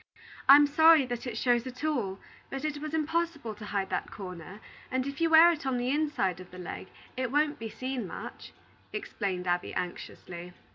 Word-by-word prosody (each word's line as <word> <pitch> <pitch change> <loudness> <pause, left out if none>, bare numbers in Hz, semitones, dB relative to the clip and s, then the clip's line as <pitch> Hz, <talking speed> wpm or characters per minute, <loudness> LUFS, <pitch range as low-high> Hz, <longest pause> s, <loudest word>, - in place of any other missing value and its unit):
"I'm 290 +1 +10
sorry 315 0 +6
that 245 0 -5
it 230 -2 -4
shows 240 +1 +2
at 255 +2 -8
all; 235 -12 -1 0.3
but 270 +2 -4
it 300 -1 -2
was 310 +1 -3
impossible 320 -6 -1
to 210 0 -10
hide 200 -2 -2
that - - -2
corner, 180 0 -8 0.3
and 260 0 -1
if 280 +3 -5
you 330 - +3
wear 325 +2 +8
it 325 - -4
on 265 -2 0
the 245 +1 0
inside 290 - 0
of 185 - -11
the 180 - -12
leg, 180 +1 -7 0.3
it 255 -2 -2
won't 295 +1 +1
be 225 0 -5
seen 255 -3 -4
much," - - -8 0.4
explained 200 - -3
Abby, 175 0 -1
anxiously. 175 0 -6
255 Hz, 190 wpm, -29 LUFS, 195-300 Hz, 0.4 s, I'm